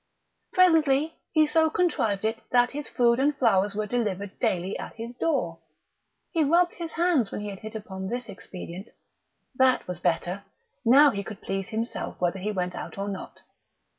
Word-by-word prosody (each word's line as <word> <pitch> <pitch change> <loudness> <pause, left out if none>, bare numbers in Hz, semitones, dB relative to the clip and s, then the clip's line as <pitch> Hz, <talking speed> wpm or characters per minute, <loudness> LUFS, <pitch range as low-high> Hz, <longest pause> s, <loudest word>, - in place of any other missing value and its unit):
Presently 320 -4 +4 0.2
he 310 -1 +5
so 320 +1 +3
contrived 225 - 0
it 220 +1 -1
that 245 0 +4
his 295 0 -5
food 235 0 +3
and 285 +1 +2
flowers 200 -4 +3
were 215 0 -1
delivered 205 -4 -2
daily 185 +1 0
at - - -7
his 235 +1 -7
door. 245 - -1 0.7
He 325 - +2
rubbed 345 +4 +3
his 335 -2 -6
hands 330 - +2
when - - -4
he 210 - -4
had 195 -1 -7
hit 220 +1 -8
upon 190 -3 -6
this 245 +3 -3
expedient. 190 0 -8 0.6
That 260 0 +3
was 180 -2 -5
better! 175 +3 -1 0.4
Now 275 +5 +7
he 200 - -3
could 210 0 -9
please 195 0 -3
himself 225 +1 -4
whether 180 +2 0
he 210 +3 -2
went 180 -3 -2
out - - -7
or 200 +1 -3
not.... 195 -2 -7
225 Hz, 175 wpm, -26 LUFS, 195-285 Hz, 0.7 s, Now